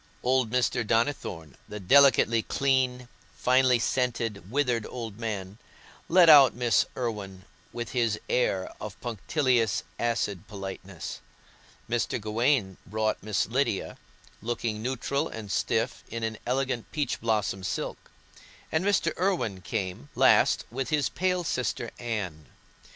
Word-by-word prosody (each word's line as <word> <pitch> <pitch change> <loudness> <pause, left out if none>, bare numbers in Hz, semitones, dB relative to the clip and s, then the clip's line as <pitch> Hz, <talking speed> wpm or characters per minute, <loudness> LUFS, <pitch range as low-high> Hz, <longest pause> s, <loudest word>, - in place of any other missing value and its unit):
Old 130 -2 +2
Mr. 125 +1 +1
Donnithorne, 110 - -1
the 105 - -6
delicately 115 +1 +5
clean, 130 -1 0 0.3
finely 130 0 +4
scented, 115 -5 -1
withered 125 -3 0
old 115 -4 -7
man, 105 -3 -4 0.5
led 175 0 +6
out 140 -5 +8
Miss 120 -2 +2
Irwine, 100 -6 -4 0.3
with 120 -1 -5
his 115 -4 0
air 95 -7 0
of 105 -2 -7
punctilious, 120 - 0 0.2
acid 110 -6 -1
politeness; 95 -2 -7 0.7
Mr. 120 +1 -1
Gawaine 110 -2 +1
brought 110 +2 -1
Miss 105 0 0
Lydia, 120 -3 -1 0.5
looking 115 -1 -3
neutral 140 +4 -1
and 105 -3 -7
stiff - - 0
in 115 0 -5
an 110 0 -3
elegant 130 -2 -1
peach 145 -5 -2
blossom 105 -4 0
silk; 95 - -4 0.6
and 160 +3 +1
Mr. 195 -5 +2
Irwine 175 - 0
came 90 -5 -4
last - - +4
with 130 +1 -3
his 150 -2 +1
pale 180 -1 0
sister 125 -5 -2
Anne. 95 - -4
115 Hz, 125 wpm, -27 LUFS, 105-130 Hz, 0.7 s, out